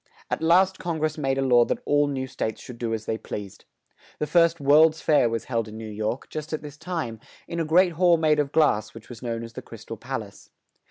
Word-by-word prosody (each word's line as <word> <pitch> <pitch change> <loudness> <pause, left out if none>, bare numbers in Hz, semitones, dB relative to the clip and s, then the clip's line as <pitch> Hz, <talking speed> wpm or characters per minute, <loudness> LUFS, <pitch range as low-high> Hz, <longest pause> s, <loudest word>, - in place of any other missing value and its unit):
At - - -1
last 185 +4 +4
Con 170 -2 -3
gress 155 0 -1
made 135 -3 -1
a 135 - +1
law 120 -2 +5
that - - -1
all 145 0 +3
new 135 -2 -2
states 110 -4 -4
should 120 -2 -10
do 115 -2 -2
as 110 -1 -3
they 110 - -2
pleased. 100 -2 -8 0.5
The 150 - -1
first 170 +1 +3
"World's 155 +3 +5
Fair" 145 -7 +3
was 115 0 -2
held 115 -3 -2
in 110 0 -9
New 110 0 -7
York, 110 +4 -3
just 155 +1 -6
at 155 - -3
this 145 -1 -9
time, 150 -9 -4 0.3
in 170 - -4
a 165 - 0
great 175 +3 +4
hall 175 +1 +4
made 155 -2 +2
of 140 -2 0
glass, 115 -11 +2
which 115 - -12
was 120 - -10
known 115 -2 -3
as 115 0 -9
"The - - -7
Crys - - -12
tal - - -7
Pal - - -4
ace." - - -16
145 Hz, 250 wpm, -25 LUFS, 115-160 Hz, 0.5 s, law